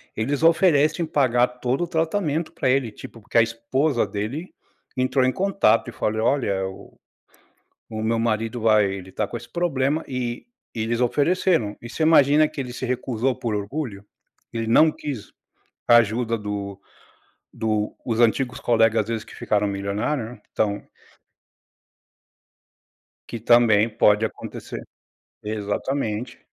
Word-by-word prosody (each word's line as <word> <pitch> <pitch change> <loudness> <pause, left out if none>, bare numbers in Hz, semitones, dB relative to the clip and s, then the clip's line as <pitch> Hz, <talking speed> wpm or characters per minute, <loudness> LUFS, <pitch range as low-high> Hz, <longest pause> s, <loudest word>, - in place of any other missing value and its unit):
eles 140 +7 -1
oferecem 165 -1 +4
pagar 130 -6 +3
todo 125 +6 0
o - - -2
tratamento 165 -1 -1
para - - 0
ele, 130 -3 +2
tipo, 115 +1 -11
porque 110 - -2
a - - +8
esposa 115 +3 0
dele 110 - -5 0.4
entrou 130 0 +2
em 130 - +2
contato 185 - +2
e - - -10
falei: 110 +1 -1
"Olha, 105 -7 +1
o 95 - -12 0.9
o 110 -1 -5
meu 115 +1 +1
marido 115 +1 -1
vai 110 -2 +4
ele 95 -1 -7
está 105 +2 -2
com - - -5
esse - - -9
problema 155 -3 0
e 125 - -4 0.3
e 115 - -4
eles 115 +2 -1
ofereceram." 145 - +1
E 120 - -9
você 155 - -4
imagina 155 -1 +5
que 155 -2 -7
ele 125 -2 -5
se 125 - -6
recusou 125 0 -1
por 115 -3 -3
orgulho? 105 0 -4 0.5
Ele 115 -1 -3
não 155 +8 +5
quis 140 -10 -7 0.6
ajuda 115 0 +4
do 100 -1 -5 0.7
do 110 -1 -1
os 115 -3 -2
antigos 120 +2 +2
colegas, 115 -2 +3
às - - -15
vezes, 115 -2 -3
que - - -14
ficaram 105 -1 0
milionário, 100 +7 -2
né, 115 0 -10
então. 105 -1 -1 2.5
Que 115 - -5
também 115 -2 +5
pode 105 0 +3
acontecer. 110 - -6 0.6
Exatamente. 110 +3 -3
120 Hz, 140 wpm, -23 LUFS, 110-140 Hz, 2.5 s, a